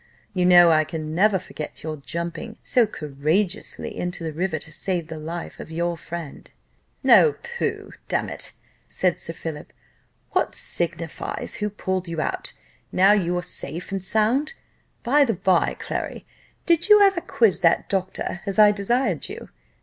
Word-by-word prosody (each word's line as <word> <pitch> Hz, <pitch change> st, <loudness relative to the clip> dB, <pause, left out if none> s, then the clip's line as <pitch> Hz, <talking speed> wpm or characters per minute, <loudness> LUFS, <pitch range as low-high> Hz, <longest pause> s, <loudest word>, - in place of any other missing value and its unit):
You 180 Hz, -2 st, +1 dB
know 175 Hz, -1 st, +8 dB
I 155 Hz, -1 st, +4 dB
can 155 Hz, 0 st, -5 dB
never 195 Hz, +3 st, +4 dB
forget 155 Hz, -4 st, -8 dB
your 155 Hz, -1 st, -4 dB
jumping 170 Hz, +9 st, -5 dB
so 240 Hz, -3 st, +3 dB
courageously 165 Hz, +5 st, -2 dB
into 175 Hz, -1 st, -4 dB
the 160 Hz, -1 st, -3 dB
river, 175 Hz, +1 st, -1 dB
to 155 Hz, +1 st, -6 dB
save 175 Hz, 0 st, -2 dB
the 160 Hz, -1 st, -6 dB
life 165 Hz, +2 st, -6 dB
of -, -, -8 dB
your 170 Hz, +1 st, -1 dB
friend." 165 Hz, -2 st, -8 dB, 0.6 s
"Oh, 455 Hz, -, +7 dB
pooh! 475 Hz, 0 st, -3 dB, 0.2 s
damn -, -, 0 dB
it," -, -, -3 dB, 0.3 s
said 180 Hz, -2 st, 0 dB
Sir 165 Hz, -, -5 dB
Philip, 160 Hz, -2 st, -7 dB, 0.6 s
"what -, -, 0 dB
signifies 170 Hz, -1 st, -2 dB
who 210 Hz, 0 st, -1 dB
pulled 190 Hz, -2 st, -3 dB
you 165 Hz, -1 st, -4 dB
out, -, -, -3 dB, 0.4 s
now 190 Hz, +2 st, +5 dB
you 180 Hz, -4 st, +2 dB
are 175 Hz, -, -2 dB
safe 175 Hz, 0 st, -3 dB
and 195 Hz, -2 st, -3 dB
sound? 225 Hz, -, +1 dB, 0.5 s
By 285 Hz, +4 st, +4 dB
the 230 Hz, -6 st, 0 dB
bye, 180 Hz, -1 st, +2 dB
Clary, -, -, -4 dB, 0.4 s
did 335 Hz, +3 st, +3 dB
you 420 Hz, 0 st, +9 dB
ever 385 Hz, -3 st, +4 dB
quiz 220 Hz, -, +2 dB
that 170 Hz, -3 st, +3 dB
doctor, 190 Hz, -1 st, -2 dB
as 195 Hz, -, -2 dB
I 210 Hz, -1 st, +8 dB
desired 210 Hz, -, 0 dB
you? -, -, -8 dB
180 Hz, 160 wpm, -23 LUFS, 165-210 Hz, 0.6 s, you